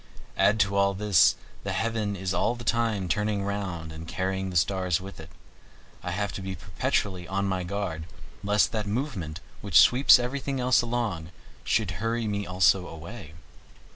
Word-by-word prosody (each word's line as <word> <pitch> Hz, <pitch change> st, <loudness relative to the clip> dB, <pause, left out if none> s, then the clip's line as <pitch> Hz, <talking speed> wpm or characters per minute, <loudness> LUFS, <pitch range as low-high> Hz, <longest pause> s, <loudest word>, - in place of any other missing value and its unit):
Add 105 Hz, +2 st, +3 dB
to 100 Hz, 0 st, +1 dB
all 100 Hz, 0 st, +3 dB
this, 100 Hz, -4 st, +4 dB, 0.3 s
the -, -, -2 dB
heaven 110 Hz, -3 st, -1 dB
is 95 Hz, 0 st, -3 dB
all 120 Hz, -, +1 dB
the 120 Hz, -, -9 dB
time 115 Hz, -6 st, 0 dB
turning 105 Hz, +2 st, 0 dB
round 95 Hz, -5 st, -4 dB
and 80 Hz, +1 st, -9 dB
carrying 95 Hz, +2 st, -2 dB
the 90 Hz, -, -7 dB
stars 90 Hz, 0 st, +1 dB
with 95 Hz, -1 st, -10 dB
it. 80 Hz, 0 st, -10 dB, 0.7 s
I -, -, -5 dB
have 100 Hz, +3 st, -2 dB
to -, -, -5 dB
be 95 Hz, 0 st, -4 dB
perpetually 90 Hz, +1 st, -2 dB
on 100 Hz, +1 st, -1 dB
my 95 Hz, -2 st, -1 dB
guard 90 Hz, -4 st, -4 dB, 0.4 s
lest 105 Hz, +1 st, +3 dB
that 110 Hz, -2 st, -2 dB
movement, 100 Hz, -, -3 dB, 0.2 s
which 100 Hz, -5 st, +5 dB
sweeps 130 Hz, +3 st, +7 dB
everything 135 Hz, +2 st, -3 dB
else 125 Hz, 0 st, +4 dB
along, 115 Hz, -9 st, -2 dB, 0.3 s
should 105 Hz, -5 st, +1 dB
hurry 115 Hz, +1 st, -1 dB
me 100 Hz, -2 st, -2 dB
also 90 Hz, 0 st, +3 dB
away. 80 Hz, 0 st, -10 dB
100 Hz, 170 wpm, -27 LUFS, 90-110 Hz, 0.7 s, sweeps